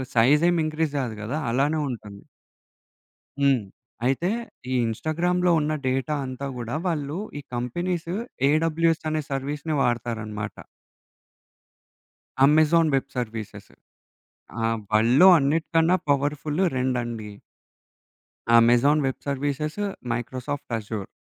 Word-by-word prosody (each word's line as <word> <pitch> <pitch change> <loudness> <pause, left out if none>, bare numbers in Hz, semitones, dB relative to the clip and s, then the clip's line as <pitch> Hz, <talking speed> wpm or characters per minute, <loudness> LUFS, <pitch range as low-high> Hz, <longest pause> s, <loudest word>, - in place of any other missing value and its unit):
Size 135 +7 +5
ఏం 175 - +1
increase 155 -1 -1
గాదు 120 -5 -3
కదా! 125 +8 -3
అలానే 145 +6 +1
ఉంటుంది. 105 -5 -8 1.2
హ్మ్. 135 -5 +3 0.4
అయితే 135 +8 +1 0.4
ఈ - - 0
ఇన్‌స్టాగ్రామ్‌లో 175 +9 0
ఉన్న 150 +1 -1
డేటా 135 +4 0
అంతా 130 +2 -5
గూడా 120 +2 -4
వాళ్ళు 150 -2 -2 0.2
ఈ - - -7
కంపెనీస్ 170 +8 -2 0.4
ఏడబల్యూఎస్ 165 +1 +1
అనే 155 0 -1
సర్వీస్‌ని 145 +3 -2
వాడతారనమాట. 110 -3 -2 1.9
Amazon 155 +3 +5
web 135 +1 -1
services. 110 -3 -5 0.9
ఆ! - - +3 0.3
వల్డ్‌లో 120 +11 +6
అన్నిటికన్న 165 +3 +2 0.2
powerful 145 +4 0
రెండండి. 120 -4 -2 1.3
Amazon 120 +6 +4
web 130 - -2
services, 145 +4 -2 0.3
Microsoft 125 +3 -4
assure. 105 -2 -5
140 Hz, 100 wpm, -25 LUFS, 120-155 Hz, 1.9 s, వల్డ్‌లో